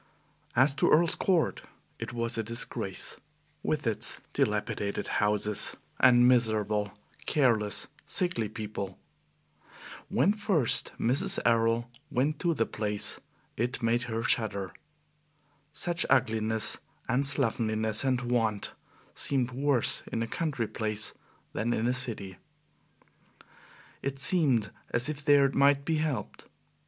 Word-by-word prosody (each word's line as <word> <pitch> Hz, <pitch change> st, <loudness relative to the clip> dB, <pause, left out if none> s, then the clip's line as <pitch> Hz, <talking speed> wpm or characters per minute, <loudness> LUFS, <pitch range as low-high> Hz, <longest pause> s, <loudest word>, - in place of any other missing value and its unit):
As 135 Hz, +3 st, +4 dB
to -, -, +2 dB
Earl's 165 Hz, +2 st, +4 dB
Court, 180 Hz, -5 st, 0 dB, 0.4 s
it -, -, -5 dB
was 115 Hz, -1 st, -1 dB
a 115 Hz, -, 0 dB
disgrace, 115 Hz, +2 st, -3 dB, 0.4 s
with -, -, -2 dB
its -, -, 0 dB, 0.2 s
dilapidated 100 Hz, -1 st, -1 dB
houses 105 Hz, 0 st, +1 dB, 0.2 s
and 120 Hz, -1 st, +6 dB
miserable, 110 Hz, -4 st, +1 dB, 0.4 s
careless, 115 Hz, -8 st, +2 dB, 0.2 s
sickly 175 Hz, -, 0 dB
people. 105 Hz, -3 st, -6 dB, 1.1 s
When 200 Hz, -, +2 dB
first 200 Hz, -, +1 dB
Mrs. 125 Hz, +4 st, +2 dB
Errol 115 Hz, 0 st, +2 dB, 0.2 s
went 145 Hz, +3 st, 0 dB
to 170 Hz, -2 st, 0 dB
the 115 Hz, -, +1 dB
place, 105 Hz, -1 st, 0 dB, 0.4 s
it 120 Hz, +2 st, -2 dB
made 115 Hz, +1 st, +2 dB
her 115 Hz, 0 st, -2 dB
shudder. 100 Hz, -6 st, 0 dB, 1.0 s
Such 170 Hz, +3 st, 0 dB
ugliness 110 Hz, -3 st, +2 dB, 0.3 s
and 130 Hz, +2 st, +1 dB
slovenliness 110 Hz, -5 st, +1 dB
and 130 Hz, -2 st, +1 dB
want 115 Hz, -4 st, -1 dB, 0.4 s
seemed 130 Hz, -3 st, 0 dB
worse 135 Hz, -1 st, +2 dB
in 115 Hz, -, -1 dB
a -, -, -4 dB
country 135 Hz, -6 st, -2 dB
place 110 Hz, -1 st, -2 dB, 0.4 s
than 120 Hz, +2 st, -1 dB
in 110 Hz, -, -1 dB
a 125 Hz, -, +2 dB
city. 110 Hz, -7 st, -1 dB, 1.6 s
It 140 Hz, 0 st, -3 dB
seemed 135 Hz, -, +3 dB, 0.2 s
as 120 Hz, +4 st, +4 dB
if 145 Hz, -1 st, -4 dB
there 145 Hz, -1 st, +5 dB
it 135 Hz, -, 0 dB
might 140 Hz, 0 st, +3 dB
be 160 Hz, -1 st, 0 dB
helped. 150 Hz, -8 st, -3 dB
120 Hz, 120 wpm, -29 LUFS, 110-140 Hz, 1.6 s, and